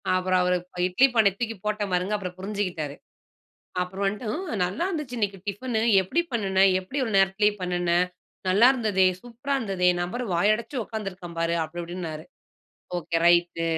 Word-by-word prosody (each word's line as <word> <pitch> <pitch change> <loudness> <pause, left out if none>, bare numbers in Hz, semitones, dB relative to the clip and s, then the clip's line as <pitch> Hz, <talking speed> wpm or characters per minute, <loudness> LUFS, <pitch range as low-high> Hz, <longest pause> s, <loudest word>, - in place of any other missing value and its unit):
அப்புறம் 185 0 +2
அவர் 180 0 +2 0.3
இட்லி 250 +10 +4
பானைய 200 -4 +5
தூக்கி 225 -2 -2
போட்டேன் 210 -2 -1
பாருங்க. 180 +4 0
அப்புறம் 180 -2 -6
புரிஞ்சுக்கிட்டாரு. 185 -7 -3 0.9
அப்புறம் 190 +2 -4
வந்துட்டு 210 +4 -2
"ம் 310 - -4
நல்லா 195 - -2
இருந்துச்சு, 300 -9 -4
இன்னைக்கு 200 -2 -1
டிஃபன்னு. 220 +3 -2 0.2
எப்படி 315 - 0
பண்ணின? 195 -4 +2 0.2
எப்படி 265 +10 -4
ஒரு 220 - -3
நேரத்திலேயே 200 +2 +3
பண்ணின? 175 -1 +1 0.5
நல்லாயிருந்ததே, 215 -2 +4 0.2
சூப்பரா 245 +4 -4
இருந்ததே. 190 -6 +1
நபர் 245 +8 -3
வாய 205 +5 +4
அடைச்சு 235 +2 -4
உட்காந்துருக்கேன் 190 -6 -6
பாரு." 165 0 +1
அப்படி 170 +2 -6
இப்படின்னாரு. 170 -3 -6 0.7
Okay 165 0 -2
right. 175 -1 +3
195 Hz, 150 wpm, -25 LUFS, 180-225 Hz, 0.9 s, பானைய